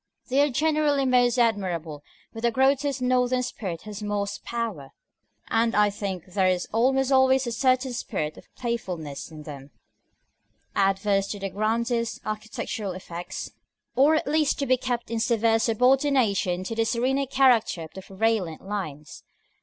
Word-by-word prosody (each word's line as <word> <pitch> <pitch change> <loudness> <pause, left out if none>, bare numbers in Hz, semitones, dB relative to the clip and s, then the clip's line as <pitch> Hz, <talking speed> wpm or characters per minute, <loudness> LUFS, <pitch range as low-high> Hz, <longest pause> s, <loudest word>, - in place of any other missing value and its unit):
They 270 +3 +3
are 290 - +3
generally 295 0 +2
most 250 -1 +3
admirable 180 -10 0 0.3
where 225 - -8
the 235 - +3
grotesque 270 +2 +1
Northern 250 0 +2
spirit 185 -8 -5
has 210 -1 -7
most 205 -1 -3
power; 220 - -4 0.5
and 230 0 +1
I 210 0 +4
think 195 -4 -4
there 190 -2 +3
is 180 -1 0
almost 265 +4 +2
always 265 0 +4
a 240 - -3
certain 255 +1 +1
spirit 155 -10 -3
of - - -15
playfulness 180 - -4
in 155 -2 -10
them, 140 -2 -9 1.1
adverse 195 0 +2
to 205 - -5
the 195 -1 -4
grandest 230 +3 -1
architectural 215 -2 -4
effects, 175 -1 -7 0.4
or 290 +4 +5
at 315 - 0
least 300 0 +1
to 280 - -1
be 255 -1 +4
kept 245 -2 -3
in 230 - -1
severe 225 -1 +2
subordination 230 -6 +2
to 210 - -4
the 225 0 +1
serener 265 +4 0
character 245 -10 +3
of 160 - -11
the 190 - -8
prevalent 195 -4 -1
lines. 155 -8 -5
225 Hz, 155 wpm, -25 LUFS, 195-255 Hz, 1.1 s, or